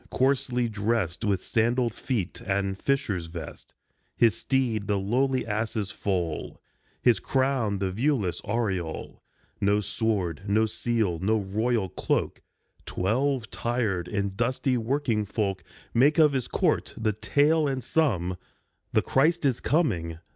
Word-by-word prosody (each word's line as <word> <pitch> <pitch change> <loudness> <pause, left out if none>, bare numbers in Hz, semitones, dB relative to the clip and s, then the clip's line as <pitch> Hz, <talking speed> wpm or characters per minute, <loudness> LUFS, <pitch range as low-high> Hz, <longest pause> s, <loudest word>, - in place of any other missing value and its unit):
Coarsely 130 -2 +1
dressed 105 -4 -1
With 100 -4 0
sandalled 120 +1 +1
feet 110 -7 -3
and 95 0 0
fisher's 100 -8 -1
vest, 85 0 -9 0.4
His 115 -5 +4
steed 120 -5 0
the 105 - +1
lowly 130 +7 +1
ass's 110 -1 -2
foal, 90 -5 -2 0.4
His 120 -5 +5
crown 130 -3 0
the 95 -1 -1
viewless 110 - 0
aureole; 95 -7 -3 0.4
No 100 +1 +3
sword, 105 -5 -1
no 110 +2 +3
seal, 110 -5 -1
no 105 +5 +2
royal 110 +2 0
cloak; - - -1 0.5
Twelve 120 +4 0
tired 110 -8 -1
and 100 0 -2
dusty 125 +3 0
working 120 -2 0
folk 100 -1 -2 0.3
Make 140 +6 +4
of 150 -3 +6
his 130 -3 -1
court - - 0
the 110 -1 0
tale 150 +8 +2
and 135 -2 -2
sum. 95 - +1 0.6
The - - +3
Christ 160 +4 +2
is 130 -4 +2
coming 90 - 0
110 Hz, 130 wpm, -27 LUFS, 95-130 Hz, 0.6 s, of